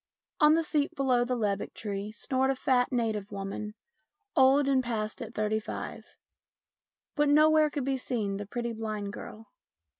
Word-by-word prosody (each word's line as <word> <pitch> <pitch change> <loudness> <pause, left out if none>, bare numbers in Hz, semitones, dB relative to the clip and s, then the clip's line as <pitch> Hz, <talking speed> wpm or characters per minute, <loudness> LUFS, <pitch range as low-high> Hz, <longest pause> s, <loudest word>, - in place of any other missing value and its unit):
On 300 0 +6
the 330 - +2
seat 305 +1 0
below 260 -4 +2
the 250 +1 -1
lebbek 205 -4 -2
tree 205 -1 -4
snored 260 +4 0
a 270 - +2
fat 255 -1 +2
native 220 -5 -1
woman, 200 +2 -5 0.6
old 270 0 +5
and 265 -2 +3
past 220 -3 -3
at 230 0 -7
thirty 215 0 0
five. 215 - -7 1.0
But 295 -2 +2
nowhere 310 +1 +5
could 285 -3 -3
be 270 -1 0
seen 215 -6 -2
the 205 -1 -6
pretty 235 +2 -3
blind 215 -2 -4
girl. 220 +1 -10
240 Hz, 160 wpm, -29 LUFS, 215-275 Hz, 1.0 s, On